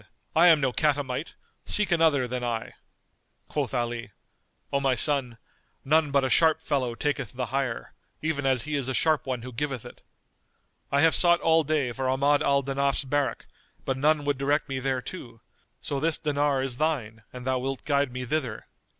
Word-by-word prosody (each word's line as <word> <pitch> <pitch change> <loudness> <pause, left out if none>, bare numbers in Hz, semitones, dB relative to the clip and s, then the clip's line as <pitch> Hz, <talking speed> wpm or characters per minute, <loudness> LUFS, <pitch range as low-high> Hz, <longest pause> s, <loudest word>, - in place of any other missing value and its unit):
I 170 +2 +6
am 165 -3 +7
no 135 -3 0
catamite: 145 -1 -1 0.3
seek 210 -2 +2
another 160 -6 +3
than 125 0 -4
I." 115 -2 -3 0.7
Quoth 145 -4 -2
Ali, 120 -2 -2 0.6
"O 140 - +3
my 135 -2 +1
son, 130 -4 +1 0.5
none 155 +2 +3
but 140 -1 +2
a - - +2
sharp 160 -1 +4
fellow 135 -7 -1
taketh 140 -4 -2
the 125 0 -3
hire, 135 -4 -2 0.3
even 155 -2 -2
as 130 -3 +2
he 150 0 -3
is 135 -2 -1
a 130 - -1
sharp 155 -3 +1
one 125 -3 -3
who 125 0 -8
giveth 135 -1 -3
it. - - -12 0.9
I 140 +1 +3
have 160 +1 +5
sought 175 -1 +5
all 160 0 +4
day 150 -4 0
for 130 +2 -2
Ahmad 140 +2 +2
al 140 0 +2
Danaf's 140 +1 0
barrack, 140 +1 -1 0.4
but 135 - 0
none 150 +2 +2
would 145 -2 0
direct 145 +2 +1
me 135 -2 -3
thereto; 130 -1 -4 0.4
so 140 - -3
this 160 +2 +1
dinar 145 -2 0
is 125 -2 -4
thine 125 -8 -1
an 125 -1 -9
thou 130 0 0
wilt 135 +1 -4
guide 140 -2 +1
me 125 0 -5
thither." 130 -5 -3
140 Hz, 185 wpm, -26 LUFS, 125-150 Hz, 0.9 s, am